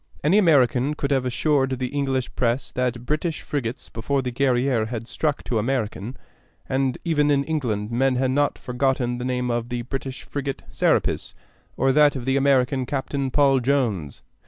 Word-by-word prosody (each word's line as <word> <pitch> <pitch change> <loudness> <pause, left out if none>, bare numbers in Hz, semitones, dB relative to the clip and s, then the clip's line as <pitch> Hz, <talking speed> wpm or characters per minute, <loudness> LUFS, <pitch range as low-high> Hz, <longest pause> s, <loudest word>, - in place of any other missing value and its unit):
Any 175 +8 +4
American 140 - +3
could 140 -1 -2
have 135 -2 +2
assured 135 +1 +1
the 125 0 -2
English 135 -2 -1
press 125 +2 -1
that 125 -1 -2
British 155 +2 -2
frigates 130 -4 -4
before 135 +4 -2
the 125 - -2
Guerrière 125 -2 +1
had 115 -1 -5
struck 150 +1 -1
to 115 - -1
American; 115 -1 -2 0.5
and 130 -1 0
even 150 -3 +2
in 140 -1 +3
England 120 -9 -2
men 130 +2 +2
had 130 +1 +1
not 145 +2 +1
forgotten 125 -1 -1
the 125 - -4
name 125 -1 -1
of 120 0 -2
the 120 -1 -3
British 135 +1 -5
frigate 140 -1 -4
Serapis, - - 0 0.4
or 135 +1 +3
that 145 +1 +5
of 125 -3 -5
the 135 0 +1
American 135 -1 +2
captain 140 0 -2
Paul 135 0 +4
Jones. 120 - -1
130 Hz, 170 wpm, -23 LUFS, 125-140 Hz, 0.5 s, that